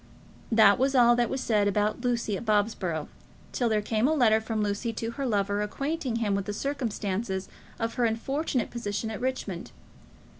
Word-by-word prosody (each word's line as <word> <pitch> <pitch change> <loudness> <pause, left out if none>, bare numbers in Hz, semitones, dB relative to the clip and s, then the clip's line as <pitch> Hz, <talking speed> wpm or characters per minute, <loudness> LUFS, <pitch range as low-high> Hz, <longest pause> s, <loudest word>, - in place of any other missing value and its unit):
That 220 -3 +6
was 270 +1 +2
all 240 -1 +6
that 240 -1 +1
was 265 - -2
said 210 -4 +2
about 210 +3 0
Lucy 235 -4 0
at 195 - -5
Bobsborough, 205 -7 0 0.4
till 240 -2 0
there 215 -1 +1
came 220 +3 +1
a 315 - +2
letter 220 -6 +4
from 220 -1 -2
Lucy 210 +3 -1
to 225 +1 -3
her 275 +2 -3
lover 205 -2 0
acquainting 275 +4 -2
him 220 -3 0
with 200 -1 -1
the 205 - -3
circumstances 210 -7 -2 0.3
of 230 -1 -2
her 245 -2 +1
unfortunate 255 +3 -1
position 220 -1 -3
at 220 - -6
Richmond. 245 -9 -3
225 Hz, 180 wpm, -27 LUFS, 205-245 Hz, 0.4 s, That